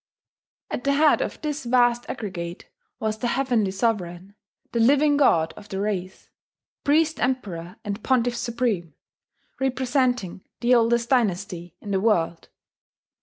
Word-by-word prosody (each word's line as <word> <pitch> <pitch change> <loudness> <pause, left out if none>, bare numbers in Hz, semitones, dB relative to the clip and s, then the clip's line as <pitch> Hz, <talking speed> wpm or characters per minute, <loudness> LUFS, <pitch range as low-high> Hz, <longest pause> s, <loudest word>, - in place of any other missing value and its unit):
At 245 - -3
the 280 - +2
head 300 +1 +4
of - - -3
this 300 -1 -3
vast 240 -1 +2
aggregate 180 -7 -5 0.3
was 220 0 -2
the 240 - -1
Heavenly 240 -5 +1
Sovereign, 190 -3 -2 0.4
the 235 - -1
Living 285 +5 +4
God 165 - +3
of 205 - -13
the 190 - -4
race, 190 -2 -3 0.6
Priest 315 +2 +2
Emperor 190 -10 -2
and 205 +1 -4
Pontiff 245 -2 +2
Supreme, 235 - -2 0.6
representing 255 -7 0 0.2
the 245 +1 +3
oldest 235 0 +3
dynasty 190 -7 0
in 205 - -6
the 195 - +2
world. 170 -6 0
230 Hz, 130 wpm, -24 LUFS, 190-255 Hz, 0.6 s, head